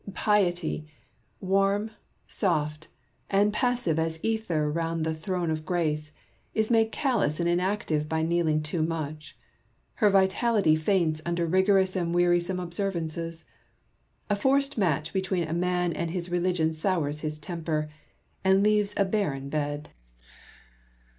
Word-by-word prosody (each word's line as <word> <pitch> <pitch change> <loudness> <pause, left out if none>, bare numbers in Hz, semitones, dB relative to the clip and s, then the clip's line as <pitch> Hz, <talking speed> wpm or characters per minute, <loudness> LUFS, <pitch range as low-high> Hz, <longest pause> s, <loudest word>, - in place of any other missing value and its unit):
Piety 175 -7 +1 0.3
— 115 - -40 0.2
warm, 195 +3 +1 0.3
soft, 155 -4 -1 0.4
and 205 +1 +3
passive 240 - +1
as 160 0 -1
the 195 - -2
ether 180 -9 0
round 165 0 -1
the 160 - 0
throne 170 +1 -2
of 155 0 -2
Grace 155 -3 -1 0.2
— - - -39
is 220 +1 +1
made 225 -1 +3
callous 230 - 0
and 170 - +1
inactive 175 -4 0
by 160 0 0
kneeling 160 -2 +1
too 155 +2 -2
much: 155 -1 -4 0.6
lier 210 - +6
vitality 195 -2 +3
faints 155 -1 +1
under 170 0 -1
rigorous 190 +2 +3
and 170 -2 -1
wearisome 175 +1 +2
observances. 170 -2 -3 0.8
A 205 - +1
forced 275 +6 +2
match 165 -7 0
between 190 -3 -1
a 160 - -3
man 180 0 0
and 170 +1 -2
his 175 0 -4
religion 175 -2 +1
sours 155 -3 -1
his 155 -1 -3
temper, 155 -1 -3 0.6
and 190 +1 +4
leaves 210 -1 +2
a 200 - +3
barren 160 -10 -1
bed. 145 0 -3
175 Hz, 140 wpm, -27 LUFS, 155-195 Hz, 0.8 s, lier